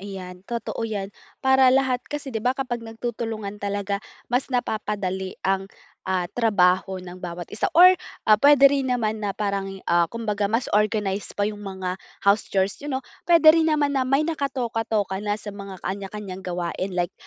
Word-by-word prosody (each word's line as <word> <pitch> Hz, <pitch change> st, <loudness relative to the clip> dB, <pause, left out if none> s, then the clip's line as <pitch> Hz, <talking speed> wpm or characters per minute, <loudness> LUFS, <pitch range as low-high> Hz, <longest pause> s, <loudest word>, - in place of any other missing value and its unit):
ayan, 185 Hz, -2 st, -8 dB
totoo 235 Hz, -1 st, -4 dB
'yan. 205 Hz, -3 st, -3 dB, 0.3 s
Para 265 Hz, -1 st, +6 dB
lahat 260 Hz, -1 st, +3 dB
kasi, 290 Hz, -3 st, -5 dB
'di 220 Hz, -, -2 dB
ba, 250 Hz, +3 st, +1 dB
kapag 245 Hz, -3 st, -3 dB
nagtutulungan 225 Hz, -2 st, -5 dB
talaga, 200 Hz, 0 st, -2 dB, 0.3 s
mas 250 Hz, +3 st, +1 dB
napapadali 205 Hz, -6 st, -2 dB
ang, 195 Hz, 0 st, 0 dB, 0.4 s
ah, 185 Hz, -1 st, +1 dB
trabaho 190 Hz, -4 st, +2 dB
ng 180 Hz, 0 st, -10 dB
bawat 175 Hz, -1 st, -5 dB
isa 210 Hz, -, 0 dB
or, 365 Hz, +2 st, +10 dB, 0.3 s
ah, 215 Hz, -, +8 dB
puwede 285 Hz, -1 st, +6 dB
rin 275 Hz, -1 st, +2 dB
naman 220 Hz, -3 st, 0 dB
na 205 Hz, -, 0 dB
parang 200 Hz, -2 st, -1 dB
ya 195 Hz, 0 st, -10 dB
ah, 170 Hz, 0 st, +3 dB
kumbaga, 210 Hz, -3 st, -2 dB
mas 230 Hz, +3 st, +1 dB
organized 210 Hz, -2 st, 0 dB
pa 205 Hz, -, +1 dB
'yong 210 Hz, 0 st, -3 dB
mga 190 Hz, -2 st, -5 dB, 0.2 s
house 200 Hz, +2 st, +3 dB
chores 195 Hz, +4 st, 0 dB
niyo 285 Hz, -2 st, -3 dB
'no? -, -, -3 dB, 0.3 s
Puwede 330 Hz, -2 st, +8 dB
rin 320 Hz, 0 st, +3 dB
naman 295 Hz, -2 st, +2 dB
na 270 Hz, -, +1 dB
may 275 Hz, +3 st, +3 dB
nakatoka-toka 230 Hz, -, -1 dB
na 205 Hz, 0 st, -1 dB
sa 210 Hz, -1 st, -8 dB
mga 200 Hz, -2 st, -8 dB
kanya-kanyang 195 Hz, -1 st, -5 dB
gawain. 180 Hz, +1 st, -3 dB
Like, 175 Hz, -1 st, 0 dB
210 Hz, 175 wpm, -24 LUFS, 195-245 Hz, 0.4 s, or